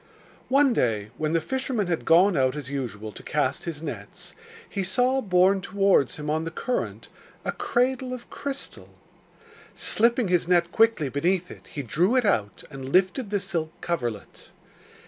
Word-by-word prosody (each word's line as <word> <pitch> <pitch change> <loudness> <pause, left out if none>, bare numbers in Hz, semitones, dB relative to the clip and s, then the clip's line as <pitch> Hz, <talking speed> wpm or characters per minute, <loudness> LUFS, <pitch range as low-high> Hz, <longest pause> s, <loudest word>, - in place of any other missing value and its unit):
One 275 0 +4
day, 110 - 0
when 155 0 0
the 165 - +3
fisherman 260 - -2
had 170 -2 -2
gone 180 +3 +5
out 130 -1 +2
as 140 -3 -5
usual 110 -6 -4
to - - -11
cast - - -1
his 165 -2 -5
nets, 110 -10 -7 0.3
he 200 - -3
saw 250 +8 +2
borne 190 -1 +3
towards 195 -8 +2
him 150 0 -7
on 155 +1 0
the 165 - -3
current 245 +9 -3 0.4
a - - 0
cradle 255 +1 0
of 250 -1 -7
crystal. 280 -1 -6 0.9
Slipping 235 0 +2
his 180 -2 +1
net 175 -1 +3
quickly 225 -10 +3
beneath 175 +7 0
it - - -13
he 145 - -6
drew 175 - +1
it 255 -3 +3
out 105 - 0
and 135 -1 -7
lifted 190 - +2
the 205 0 0
silk 170 -5 -4
coverlet. 120 - -4
180 Hz, 165 wpm, -25 LUFS, 145-225 Hz, 0.9 s, gone